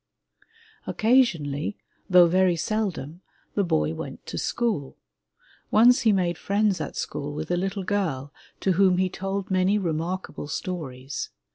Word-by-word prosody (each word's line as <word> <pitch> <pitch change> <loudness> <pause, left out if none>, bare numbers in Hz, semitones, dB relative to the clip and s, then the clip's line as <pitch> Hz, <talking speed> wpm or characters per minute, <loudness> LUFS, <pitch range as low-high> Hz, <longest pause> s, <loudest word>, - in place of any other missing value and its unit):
Occasionally, 205 - +2 0.3
though 180 -1 +8
very 180 +1 +3
seldom, 175 -4 -3 0.3
the 200 - +1
boy 80 - +1
went - - -7
to - - -6
school. 220 - -1 0.7
Once 240 +4 +6
he 225 - +4
made 175 -4 0
friends 200 -1 +1
at - - -5
school 145 +1 -4
with 155 +2 -4
a - - +3
little 195 +2 -2
girl, 160 -9 -2 0.3
to 190 - +2
whom 185 0 +4
he 185 0 +2
told 195 +1 -4
many 185 +2 +3
remarkable 170 -2 -3
stories. 140 -6 -5
185 Hz, 135 wpm, -25 LUFS, 155-200 Hz, 0.7 s, though